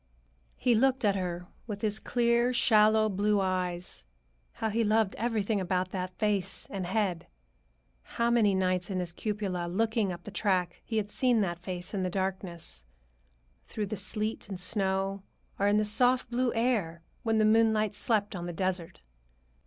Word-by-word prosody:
He 245 - +2
looked 255 +1 +2
at 200 -1 +3
her 180 -2 -3 0.2
with 205 -2 -6
his 215 0 +1
clear, 235 0 +2
shallow 215 -3 +4
blue 205 +1 +1
eyes. 180 - -2 0.5
How 220 - -2
he 230 +2 +1
loved 215 -1 +2
everything 220 -3 0
about 185 0 -1
that 185 -1 -4
face 205 -3 -1
and 190 -3 -3
head! 190 -3 -1 0.7
How 235 - -1
many 215 -5 +4
nights 185 -1 0
in 190 - -2
his 180 -2 -2
cupola, 190 -2 -3
looking 220 +2 0
up 175 - -7
the 210 - -8
track, 185 -4 0
he 225 - -3
had 205 -1 -1
seen 245 -2 +2
that 175 -3 -1
face 180 +1 -5
in 195 - -1
the 185 - 0
darkness; 185 - -4 0.8
through 210 - -3
the 210 +2 -4
sleet 210 +2 -3
and 190 -3 -4
snow, 195 0 0 0.4
or 200 - +3
in 205 +1 +4
the 215 - +2
soft 245 +4 +2
blue 245 0 +1
air 210 -9 0 0.2
when 225 -2 +1
the 215 - +4
moonlight 215 -1 +3
slept 210 -1 0
on 175 -1 -4
the 175 - -4
desert. 180 - -3
205 Hz, 170 wpm, -29 LUFS, 185-220 Hz, 0.8 s, shallow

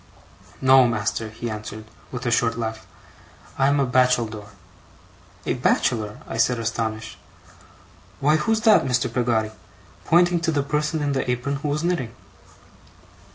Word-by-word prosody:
'No, 130 -1 +6
master,' 110 -1 -2
he 115 +2 -6
answered 110 0 -6 0.3
with 125 0 -6
a 120 - +1
short 115 -1 +1
laugh. 110 -1 -4 0.7
'I'm 140 +2 +3
a 140 - +3
bacheldore.' 120 -5 +1 1.0
'A - - 0
bachelor!' 110 -4 0
I - - -5
said, 120 +2 +2
astonished. 115 -1 -3 1.0
'Why, 150 +3 +3
who's 220 +8 0
that, 220 -2 +5
Mr. 125 -2 0
Peggotty?' 115 -3 0 0.5
pointing 175 +1 +4
to 165 0 0
the 145 -3 0
person 150 +2 -1
in 145 - 0
the 135 -2 -1
apron 125 +3 -1
who 150 - -4
was 150 +2 -1
knitting. 140 -10 -1
125 Hz, 140 wpm, -23 LUFS, 115-145 Hz, 1.0 s, No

